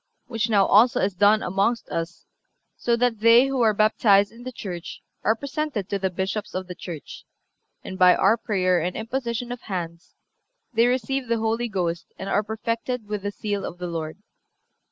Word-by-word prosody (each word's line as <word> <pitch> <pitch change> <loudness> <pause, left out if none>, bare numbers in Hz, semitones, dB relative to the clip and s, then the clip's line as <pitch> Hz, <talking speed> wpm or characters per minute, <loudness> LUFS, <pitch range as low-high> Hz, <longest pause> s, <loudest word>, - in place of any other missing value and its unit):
Which 230 -2 -2
now 200 -3 +4
also 230 +4 +5
is 195 +1 0
done 205 +4 +4
amongst 195 +6 0
us, 165 +1 -5 0.5
so 235 - +1
that 240 -2 +1
they 230 +3 +6
who 270 -2 -1
are 225 -2 +5
baptized 205 -1 +3
in 230 +1 -14
the 255 +1 -6
Church 180 -8 -7 0.2
are 220 - +3
presented 280 - -4
to 200 - -1
the 190 0 0
Bishops 190 +3 -4
of 185 0 -3
the 180 - -7
Church, 170 -4 -9 0.6
and 185 - -7
by 180 -1 +7
our 225 - +4
prayer 185 -6 +1
and 180 +2 -2
imposition 235 +1 -3
of 245 - -6
hands 170 -3 -6 0.6
they 230 +1 +4
receive 255 +1 -1
the 230 0 +1
Holy 225 +2 -1
Ghost 175 -5 -2
and 190 - -6
are - - +2
perfected 230 +2 -3
with 210 -1 -3
the 205 - -2
seal 205 -1 -3
of 175 - -6
the 180 - -5
Lord." 165 -2 -4
215 Hz, 185 wpm, -24 LUFS, 185-235 Hz, 0.6 s, by